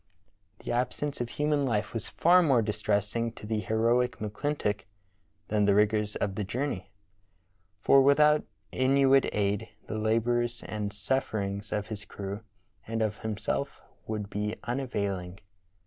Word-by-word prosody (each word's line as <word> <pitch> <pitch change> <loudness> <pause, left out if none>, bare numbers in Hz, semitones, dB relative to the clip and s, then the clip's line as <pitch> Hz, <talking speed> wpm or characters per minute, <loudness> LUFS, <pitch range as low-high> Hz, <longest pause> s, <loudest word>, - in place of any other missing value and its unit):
The - - -2
absence 125 +3 -1
of 120 - -2
human 150 +1 +1
life 115 -6 0
was 115 - -3
far 180 +2 +5
more 135 -9 +4
distressing 105 +2 0
to 105 - -10
the 110 0 -1
heroic 115 +3 +1
McClintock 105 -1 -2 0.7
than 105 -1 +2
the 100 -1 +4
rigors 105 0 +2
of 100 -1 -1
the 105 - -2
jour 120 +8 -2
ney, 95 -9 -4 0.9
for 135 - +6
without 150 +2 +5 0.3
Inuit 135 +1 +4
aid 105 +1 0 0.2
the 110 - -4
labors 120 +2 +1
and 105 -2 -3
sufferings 100 -2 -2
of 105 +1 -2
his 105 -1 -5
crew 100 +1 -6 0.5
and 115 0 0
of 105 -1 -2
himself 110 -1 -3 0.3
would 105 -2 -3
be 105 +1 -2
unavailing. 100 -8 -2
110 Hz, 140 wpm, -29 LUFS, 105-125 Hz, 0.9 s, for